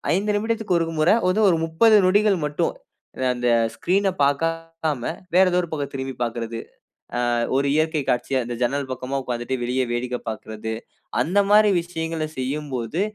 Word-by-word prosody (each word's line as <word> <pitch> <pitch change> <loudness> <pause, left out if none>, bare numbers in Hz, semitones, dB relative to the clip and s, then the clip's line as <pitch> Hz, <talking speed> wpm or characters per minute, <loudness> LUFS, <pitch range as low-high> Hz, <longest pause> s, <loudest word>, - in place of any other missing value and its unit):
5 205 +3 0
நிமிடத்துக்கு 220 -3 0
ஒரு 165 0 -2
முற 155 +3 +4 0.2
வந்து 200 +4 +2
ஒரு 175 - +3
30 215 +8 +4
நொடிகள் 205 +1 +4
மட்டும். 150 0 -1 0.5
அ - - -3
அந்த 125 0 -2 0.3
ஸ்கிரீன 195 +3 +1 0.2
பாக்காம 165 -1 -1 0.3
வேறு 185 0 +6
ஏதோ 180 - +3
ஒரு 170 - -6
பக்கம் 145 -3 -3
திரும்பி 135 0 -4
பாக்கிறது. 115 -1 -4 0.7
ஆ - - +1 0.2
ஒரு 140 +1 +1
இயற்கை 155 -1 +1
காட்சிய, 130 +1 0
இந்த 120 - -4
ஜன்னல் 135 +2 -1
பக்கமா 130 +2 -3
உக்காந்துட்டு 120 +1 -3
வெளிய 125 +2 0
வேடிக்க 125 +1 -2
பாக்குறது. 110 0 -5 0.5
அந்த 175 +10 +2
மாரி 210 0 +6
விஷயங்கள 165 -2 -3
செய்யும்போது, 135 - -3
150 Hz, 155 wpm, -23 LUFS, 125-175 Hz, 0.7 s, வேறு